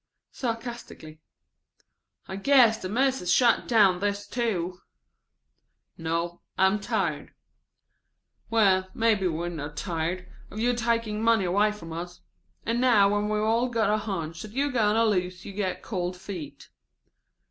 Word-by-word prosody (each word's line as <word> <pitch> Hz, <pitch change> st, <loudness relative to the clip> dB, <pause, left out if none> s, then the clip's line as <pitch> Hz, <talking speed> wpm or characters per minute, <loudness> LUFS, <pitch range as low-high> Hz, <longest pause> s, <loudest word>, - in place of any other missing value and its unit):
Sarcastically. 230 Hz, -, -6 dB, 1.1 s
("I 190 Hz, -, -5 dB
guess 230 Hz, +1 st, +4 dB
the 185 Hz, -, -4 dB
Mis'es 255 Hz, -4 st, +1 dB
shut 240 Hz, -2 st, +3 dB
down 210 Hz, -6 st, +5 dB
on -, -, -8 dB
this, 205 Hz, +1 st, -2 dB
too.") 185 Hz, -7 st, -2 dB, 1.2 s
"No, 165 Hz, +1 st, -3 dB, 0.2 s
I'm 190 Hz, +2 st, +3 dB
tired." 195 Hz, -9 st, -2 dB, 1.1 s
("Well, 190 Hz, -4 st, +3 dB
maybe 220 Hz, -4 st, +2 dB
we're 170 Hz, +1 st, -2 dB
not 150 Hz, -3 st, -7 dB
tired 175 Hz, +2 st, -3 dB, 0.2 s
of 210 Hz, -, -10 dB
you 245 Hz, +2 st, +2 dB
taking 230 Hz, -3 st, -1 dB
money 225 Hz, -3 st, +3 dB
away 200 Hz, +4 st, +2 dB
from 165 Hz, -6 st, -9 dB
us. 175 Hz, +1 st, -7 dB, 0.4 s
And 235 Hz, +2 st, 0 dB
now 220 Hz, -6 st, +5 dB
when 205 Hz, +1 st, 0 dB
we've 215 Hz, 0 st, 0 dB
all 230 Hz, +3 st, +2 dB
got 230 Hz, -3 st, +1 dB
a -, -, +2 dB
hunch 170 Hz, -6 st, -4 dB
that 215 Hz, -1 st, -9 dB
you 280 Hz, +3 st, 0 dB
are -, -, -5 dB
going 215 Hz, -4 st, +2 dB
to 230 Hz, +1 st, +3 dB
lose 185 Hz, -3 st, -1 dB
you 200 Hz, -, -7 dB
get 190 Hz, -2 st, -3 dB
cold 180 Hz, -3 st, -3 dB
feet.") 165 Hz, -7 st, -8 dB
205 Hz, 145 wpm, -26 LUFS, 180-230 Hz, 1.2 s, down